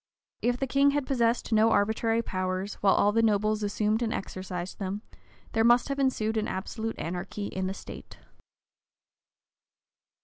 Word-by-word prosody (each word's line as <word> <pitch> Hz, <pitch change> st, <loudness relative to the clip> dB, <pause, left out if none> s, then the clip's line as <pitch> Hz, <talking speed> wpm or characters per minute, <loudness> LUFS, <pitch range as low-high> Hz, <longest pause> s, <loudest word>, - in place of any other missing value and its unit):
If 245 Hz, +1 st, +1 dB
the 270 Hz, -, -1 dB
king 275 Hz, +2 st, +3 dB
had 285 Hz, -, -1 dB
possessed 240 Hz, -4 st, +1 dB
no 220 Hz, +1 st, +5 dB
arbitrary 225 Hz, +2 st, +1 dB
powers, 185 Hz, 0 st, -2 dB
while 195 Hz, -1 st, +5 dB
all 205 Hz, -, +4 dB
the 230 Hz, +2 st, +2 dB
nobles 215 Hz, -1 st, +2 dB
assumed 210 Hz, +2 st, 0 dB
and 230 Hz, -2 st, 0 dB
exercised 185 Hz, -2 st, -5 dB
them, 200 Hz, +2 st, -4 dB, 0.5 s
there 225 Hz, -, +2 dB
must 240 Hz, +3 st, +4 dB
have 275 Hz, 0 st, -2 dB
ensued 225 Hz, -5 st, +1 dB
an 215 Hz, -, 0 dB
absolute 220 Hz, +4 st, -4 dB
anarchy 180 Hz, +4 st, -4 dB
in 185 Hz, 0 st, -2 dB
the 190 Hz, -, -3 dB
state. -, -, -10 dB
215 Hz, 150 wpm, -28 LUFS, 195-230 Hz, 0.5 s, no